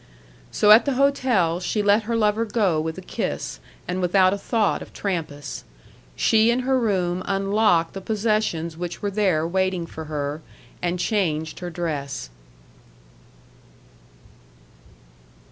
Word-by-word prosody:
So 210 - +4
at 220 +2 +8
the 280 - +1
hotel 250 -11 +2
she 205 +3 -1
let 205 +1 +3
her 230 +1 -1
lover 215 0 +2
go 200 -8 +1
with 160 +2 -4
a 190 - -8
kiss, - - -4 0.3
and 180 +1 -2
without 185 +1 +4
a - - -2
thought 215 0 0
of - - -11
Trampas. 155 -7 -4 0.5
She 220 - +3
in 240 +2 +2
her 260 0 +1
room 185 -6 0
unlocked 195 -3 +2
the 195 - -6
possessions 210 -6 -1
which 175 +2 -6
were 205 - -1
there 185 -6 +1
waiting 185 -1 0
for 160 -1 -8
her, 150 0 -4 0.4
and 175 0 -1
changed 160 -6 -1
her 180 -1 -5
dress. 145 - -4
185 Hz, 135 wpm, -23 LUFS, 165-215 Hz, 0.5 s, at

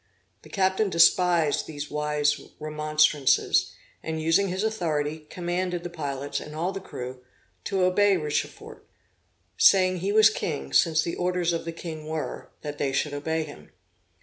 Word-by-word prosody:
The - - -16
captain 190 +1 +1
despised 170 -2 +3
these 145 -2 -7
wise 150 0 0 0.2
remonstrances; 150 -2 +2 0.3
and, 160 0 -4
using 165 +5 +2
his 185 +2 -2
authority, 155 -8 -2
commanded 175 0 -3
the 175 - -6
pilots, 140 -4 -4
and 150 0 -9
all 170 +4 -1
the 195 - -5
crew, 125 -7 -8 0.4
to 195 -2 0
obey 195 +2 +4
Richefort; 150 -3 -4 0.8
saying 185 -1 +5
he 190 +3 -2
was 220 +1 +6
king, 70 - -4
since 160 - +4
the 170 - -3
orders 180 -1 0
of 165 - -3
the 165 - -3
king 160 -2 -8
were, 155 -1 -5
that 145 -1 -6
they 140 - 0
should 145 +2 -1
obey 160 +3 -2
him. 80 - -12
160 Hz, 150 wpm, -26 LUFS, 150-180 Hz, 0.8 s, was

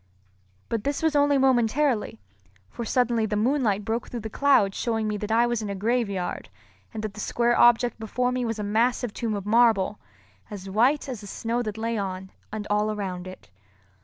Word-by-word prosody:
But 225 -2 -2
this 285 +4 -2
was 320 -2 +2
only 285 0 +4
momentarily; 255 - +1 0.5
for 235 - -5
suddenly 235 -1 +1
the 210 - -2
moonlight 215 -3 +1
broke 225 +3 -2
through 240 - -5
the 220 0 -6
clouds 270 -9 +3
showing 225 -3 -1
me 210 - -1
that 210 +1 -5
I 230 +2 +4
was 240 -2 -1
in 210 - -4
a 200 - -3
graveyard 200 -3 -2 0.4
and 220 -2 -6
that 215 -2 -4
the 210 - -10
square 240 +3 +1
object 240 0 +4
before 250 +3 -1
me 250 0 -1
was 225 -2 -2
a 210 - -3
great 205 - -4
massive 240 0 +1
tomb 225 -3 -2
of 200 -1 -5
marble, 215 -3 +3 0.5
as 195 -2 -8
white 245 +10 +2
as 250 -5 -5
the 205 - -10
snow 230 +4 -2
that 215 -2 -4
lay 225 0 -2
on 190 -1 -5 0.2
and 210 -1 -5
all 210 +1 +2
around 185 -4 -4
it. 185 - -12
225 Hz, 200 wpm, -25 LUFS, 205-245 Hz, 0.5 s, only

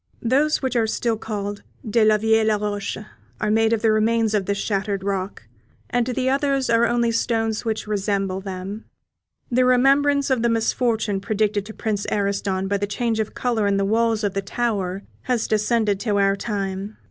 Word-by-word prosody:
Those 280 +6 +2
which 260 -1 -1
are 225 -2 +2
still 230 +1 0
called 205 -2 -5 0.3
"de 220 +1 +3
la 215 0 +5
Vieille 220 0 +2
Roche" 205 -1 -3 0.4
are 215 - 0
made 220 +1 +3
of 230 -1 0
the 220 - +4
remains 220 0 +2
of 200 -3 0
this 200 0 0
shattered 200 -1 -2
rock, 195 - -3 0.5
and 245 -1 +1
the 255 +1 -1
others 275 -1 +1
are 230 +1 +4
only 235 0 +1
stones 225 -1 -1
which 220 -1 -2
resemble 195 -2 -1
them. 195 +2 -6 0.7
The 255 +1 +3
remembrance 275 +3 +3
of 255 -3 +2
the 235 - +2
misfortune 225 -2 0
predicted 210 -1 0
to 220 - -8
Prince 210 -3 -2
Ariston 200 -1 -1
by 200 +1 0
the 205 +1 -2
change 225 +2 -1
of 215 - -3
colour 230 -4 0
in 200 0 +2
the 195 - +1
walls 225 +1 +1
of 200 -2 0
the 195 - -1
tower 195 -3 -2 0.2
has 245 -3 0
descended 215 -1 +1
to 205 -1 0
our 195 0 +3
time. 200 0 -4
215 Hz, 180 wpm, -22 LUFS, 200-235 Hz, 0.7 s, la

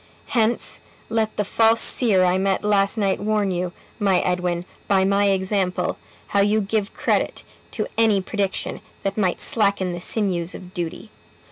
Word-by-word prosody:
Hence 230 0 +1 0.3
let 220 -1 -1
the 210 - 0
false 225 +2 +3
seer 205 -7 +2
I 180 +1 +2
met 195 0 0
last 205 0 +2
night 195 -3 +1
warn 210 -1 0
you, 180 0 -2 0.3
my 195 -3 +3
Edwin, 180 -1 -1 0.2
by 190 -2 +3
my 200 +1 +3
example, 190 -1 0 0.3
how 200 - +2
you 205 +2 +3
give 210 0 -2
credit - - 0 0.3
to - - -1
any 220 -3 +4
prediction 195 0 -2 0.2
that 195 0 -1
might 190 -5 0
slacken 200 -4 +1
the 175 - -5
sinews 180 -5 0
of 185 0 -11
duty. 175 +4 -5
195 Hz, 155 wpm, -22 LUFS, 185-210 Hz, 0.3 s, any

